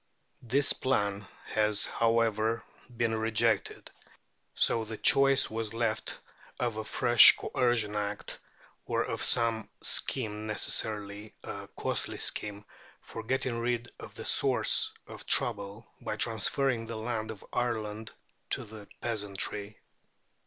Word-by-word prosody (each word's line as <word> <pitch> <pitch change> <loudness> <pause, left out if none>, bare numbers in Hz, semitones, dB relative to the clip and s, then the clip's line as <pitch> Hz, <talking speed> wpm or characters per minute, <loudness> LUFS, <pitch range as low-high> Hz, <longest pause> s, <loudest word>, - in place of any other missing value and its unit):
This 135 +4 +1
plan, 100 -6 -1 0.2
has, 105 -1 +1
however, 115 -1 +1 0.3
been 115 -1 +1
rejected, 110 +1 0 0.6
so 115 - +2
the 110 0 -7
choice 135 +2 +5
was 110 0 -5
left 115 -2 -2 0.4
of 120 -3 -2
a 110 - -3
fresh 120 +1 +7
Coercion 115 -4 0
Act, 105 0 -4 0.5
or - - 0
of - - -4
some 115 -2 +2
scheme, 110 -4 -2
necessarily 105 -1 -1
a - - -7
costly - - -1
scheme, 105 0 -2 0.4
for 115 - -8
getting 125 0 -2
rid 120 0 -2
of - - -11
the - - -7
source - - +3
of - - -11
trouble 105 -1 +1 0.2
by - - -4
transferring 115 +2 +2
the 115 -1 -5
land 110 -1 -3
of 110 -3 -9
Ireland 110 -3 -3 0.4
to - - 0
the 105 -1 -12
peasantry. 105 -2 -3
110 Hz, 120 wpm, -29 LUFS, 105-115 Hz, 0.6 s, fresh